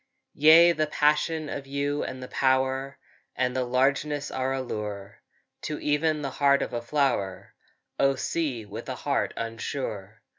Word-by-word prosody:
Yea, 160 +3 +7
the 155 -2 0
passion 150 +1 +1
of 140 -1 -6
you 140 +1 -1
and 130 0 -6
the - - -7
power 130 +1 0 0.4
And 125 0 0
the 130 - +1
largeness 140 +3 0
are 130 0 -1
a 135 - -1
lure 105 -4 -6 0.4
To 150 - -4
even 150 +1 0
the 135 - -3
heart 140 0 +3
of - - -6
a 120 - -2
flower, 120 -7 -1 0.5
O 135 0 +3
sea, 130 -5 -2
with 110 +5 -8
a 130 - -3
heart 140 +2 -1
unsure! 115 -2 -5
135 Hz, 155 wpm, -26 LUFS, 125-145 Hz, 0.5 s, Yea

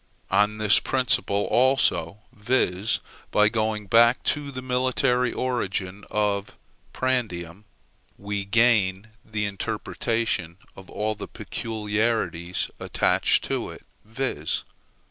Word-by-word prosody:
On 105 +2 +3
this 105 -1 +5
principle, 125 -6 +1
also, 120 -8 +2
viz. 110 -3 0 0.3
by 105 0 +4
going 110 -1 -1
back 115 +4 +5
to 145 -1 0
the 130 -2 -6
military 125 0 +1
origin 100 -6 -2
of 105 -1 -1 0.3
prandium, 105 -8 -2 0.5
we 100 0 -3
gain 105 -2 +2
the 110 -1 -2
interpretation 100 -2 -2 0.2
of 95 -1 -13
all 110 +1 -1
the - - -8
peculiarities 110 -5 -2
attached - - +2
to - - -2
it; - - -11 0.2
viz. 110 - -2
110 Hz, 105 wpm, -25 LUFS, 100-120 Hz, 0.5 s, this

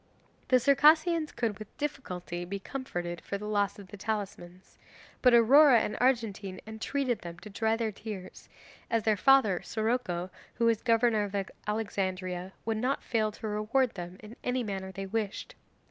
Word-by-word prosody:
The 255 - +5
Circassians 305 +5 +4
could 220 -4 -2
with 215 - -11
difficulty 180 -12 -4
be 190 +3 -4
comforted 175 -8 -5
for 200 - -4
the 210 - -7
loss 205 -1 0
of 200 -2 -12
the 205 - -9
talismans, 190 -4 -5 0.4
but 250 - +6
Aurora 245 +3 +7
and - - -2
Argentine 215 -7 0
entreated 240 +2 -2
them 170 -1 -8
to 210 +4 -11
dry 220 +2 +1
their 225 -1 -1
tears, 200 -3 -9 0.4
as 230 -1 +1
their 215 -1 +3
father, 215 -5 +4
Siroco, 220 -6 -1 0.2
who 235 - +1
was 230 -2 +3
governor 230 -3 +3
of 205 0 -6 0.3
Alexandria, 190 -4 -2
would 225 -1 0
not 255 +5 -1
fail 215 -3 0
to 220 - -6
reward 215 +5 +1
them 175 -1 -7
in 215 +2 -10
any 250 0 0
manner 190 -3 -4
they 195 0 -5
wished. 215 - -3
215 Hz, 160 wpm, -30 LUFS, 195-240 Hz, 0.4 s, Aurora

